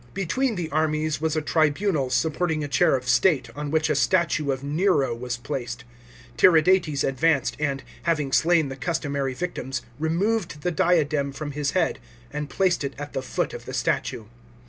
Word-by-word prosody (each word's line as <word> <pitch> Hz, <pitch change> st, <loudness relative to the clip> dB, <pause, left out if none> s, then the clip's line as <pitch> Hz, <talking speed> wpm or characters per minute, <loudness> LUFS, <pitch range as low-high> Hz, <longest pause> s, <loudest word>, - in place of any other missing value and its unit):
Between 220 Hz, +7 st, 0 dB
the 175 Hz, -3 st, -3 dB
armies 155 Hz, 0 st, 0 dB
was 160 Hz, -1 st, 0 dB
a 155 Hz, -, -1 dB
tribunal 155 Hz, -1 st, +1 dB
supporting 160 Hz, +3 st, 0 dB
a -, -, -3 dB
chair 140 Hz, -, +3 dB
of 125 Hz, -1 st, -4 dB
state, 125 Hz, 0 st, +3 dB
on 150 Hz, 0 st, -4 dB
which 155 Hz, +1 st, +1 dB
a 155 Hz, -, +2 dB
statue 155 Hz, -1 st, +1 dB
of 135 Hz, 0 st, -1 dB
Nero 145 Hz, -3 st, +1 dB
was 120 Hz, +1 st, -4 dB
placed. 120 Hz, -2 st, -5 dB, 0.5 s
Tiridates 160 Hz, 0 st, +4 dB
advanced, 140 Hz, +1 st, +1 dB
and, 140 Hz, -3 st, -1 dB, 0.2 s
having 150 Hz, -5 st, 0 dB
slain 160 Hz, 0 st, +3 dB
the 135 Hz, -, -5 dB
customary 140 Hz, -3 st, -2 dB
victims, 135 Hz, -5 st, -4 dB, 0.2 s
removed 170 Hz, +1 st, -1 dB
the 180 Hz, -, 0 dB
diadem 155 Hz, -6 st, +1 dB
from 145 Hz, +2 st, -6 dB
his 145 Hz, -1 st, -1 dB
head -, -, +1 dB, 0.3 s
and 150 Hz, -1 st, -4 dB
placed 185 Hz, -5 st, +1 dB
it 140 Hz, -, -4 dB
at 145 Hz, 0 st, -7 dB
the 135 Hz, -, -2 dB
foot -, -, -2 dB
of -, -, -8 dB
the -, -, -6 dB
statue. 110 Hz, -, -1 dB
150 Hz, 170 wpm, -24 LUFS, 135-170 Hz, 0.5 s, Tiridates